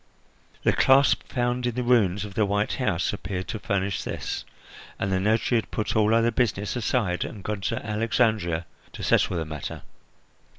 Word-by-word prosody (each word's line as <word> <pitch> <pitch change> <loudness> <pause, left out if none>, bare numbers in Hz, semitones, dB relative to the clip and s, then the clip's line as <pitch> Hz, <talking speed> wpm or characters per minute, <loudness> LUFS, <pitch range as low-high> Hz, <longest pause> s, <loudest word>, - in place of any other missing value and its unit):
The - - +4
clasp 135 +1 +5
found 125 0 0
in 120 - -2
the 125 - -1
ruins 105 -5 +3
of 100 - -9
the 110 - +2
white 105 +1 0
house 100 -8 0
appeared 95 -2 -4
to 110 - -3
furnish 100 -2 -1
this, - - -4 0.5
and 100 - -2
the 95 - +2
notary 110 +4 +2
had 110 - -7
put 105 - -2
all 110 +1 +4
other 115 +1 +3
business 110 -3 0
aside 110 -6 0
and 100 - -7
gone 105 -2 -3
to - - -2
Alexandria 105 -6 +1 0.3
to - - -7
settle 90 - +2
the 80 - -2
matter. 75 -2 -6
105 Hz, 175 wpm, -25 LUFS, 95-115 Hz, 0.5 s, clasp